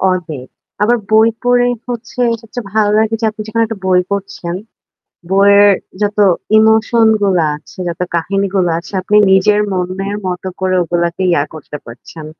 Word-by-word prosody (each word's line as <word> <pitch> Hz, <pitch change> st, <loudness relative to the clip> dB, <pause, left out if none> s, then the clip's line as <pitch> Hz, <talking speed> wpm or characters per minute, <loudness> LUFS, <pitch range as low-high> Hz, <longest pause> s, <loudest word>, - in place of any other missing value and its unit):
পড়বে। 180 Hz, -6 st, -1 dB, 0.4 s
আবার 240 Hz, +3 st, +3 dB
বই 220 Hz, +1 st, +5 dB
পড়ে 245 Hz, 0 st, +3 dB, 0.2 s
হচ্ছে 245 Hz, +2 st, -6 dB, 0.2 s
সবচেয়ে 225 Hz, -2 st, -8 dB
ভালো 215 Hz, -1 st, +2 dB
লাগে 220 Hz, 0 st, +1 dB
যে -, -, -2 dB
আপনি 215 Hz, 0 st, -8 dB
যেখানে 230 Hz, +1 st, 0 dB
একটা 215 Hz, -3 st, -8 dB
বই 185 Hz, -1 st, +4 dB
পড়ছেন। 195 Hz, -3 st, -4 dB, 0.8 s
বইয়ের 200 Hz, +1 st, +5 dB, 0.3 s
যত 205 Hz, 0 st, -1 dB, 0.4 s
ইমোশন 220 Hz, +1 st, +4 dB
গুলা 185 Hz, -5 st, +2 dB
আছে, 150 Hz, -, -18 dB
যত 170 Hz, 0 st, -6 dB
কাহিনীগুলা 190 Hz, +1 st, 0 dB
আছে, 170 Hz, -, -11 dB
আপনি 210 Hz, +3 st, +1 dB
নিজের 205 Hz, +2 st, +4 dB
মনের 190 Hz, +2 st, -3 dB
মত 180 Hz, -1 st, -3 dB, 0.2 s
করে 185 Hz, 0 st, 0 dB
ওগুলাকে 170 Hz, +1 st, -2 dB
ইয়া 145 Hz, -5 st, +2 dB
করতে 150 Hz, -1 st, -8 dB
পারছেন। 150 Hz, +6 st, -11 dB
195 Hz, 150 wpm, -15 LUFS, 180-220 Hz, 0.8 s, বই